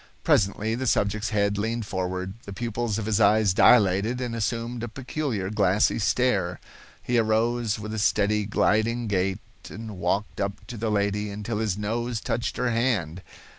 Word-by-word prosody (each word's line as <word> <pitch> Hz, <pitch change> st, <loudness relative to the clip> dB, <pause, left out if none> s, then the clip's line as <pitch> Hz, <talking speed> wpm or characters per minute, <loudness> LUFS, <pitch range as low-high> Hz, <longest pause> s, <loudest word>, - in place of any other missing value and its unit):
Presently 105 Hz, +2 st, +2 dB
the 130 Hz, +3 st, -2 dB
subject's 105 Hz, -1 st, +1 dB
head 100 Hz, -2 st, +1 dB
leaned 115 Hz, +1 st, -2 dB
forward, 95 Hz, -1 st, -3 dB
the 100 Hz, -, -7 dB
pupils 115 Hz, 0 st, -2 dB
of 110 Hz, -, -3 dB
his 110 Hz, 0 st, +1 dB
eyes 105 Hz, -1 st, +4 dB
dilated 105 Hz, +2 st, +4 dB
and 120 Hz, -2 st, -3 dB
assumed 115 Hz, +1 st, -2 dB
a 120 Hz, -, -3 dB
peculiar 125 Hz, -5 st, -3 dB
glassy 100 Hz, +1 st, +2 dB
stare. 100 Hz, -6 st, +1 dB, 0.4 s
He 120 Hz, -1 st, +1 dB
arose 115 Hz, 0 st, +1 dB
with 110 Hz, 0 st, -6 dB
a 110 Hz, -, -2 dB
steady, 105 Hz, 0 st, +2 dB
gliding 115 Hz, +3 st, +1 dB
gait 95 Hz, -2 st, 0 dB, 0.3 s
and 110 Hz, -4 st, -8 dB
walked 100 Hz, +5 st, -1 dB
up 100 Hz, 0 st, -3 dB
to 120 Hz, -, -6 dB
the 110 Hz, +1 st, -2 dB
lady 105 Hz, 0 st, 0 dB
until 105 Hz, +2 st, -4 dB
his 105 Hz, -4 st, -1 dB
nose 115 Hz, +3 st, -2 dB
touched 120 Hz, -, -2 dB
her 125 Hz, -1 st, 0 dB
hand. 105 Hz, -8 st, 0 dB
110 Hz, 165 wpm, -25 LUFS, 100-115 Hz, 0.4 s, eyes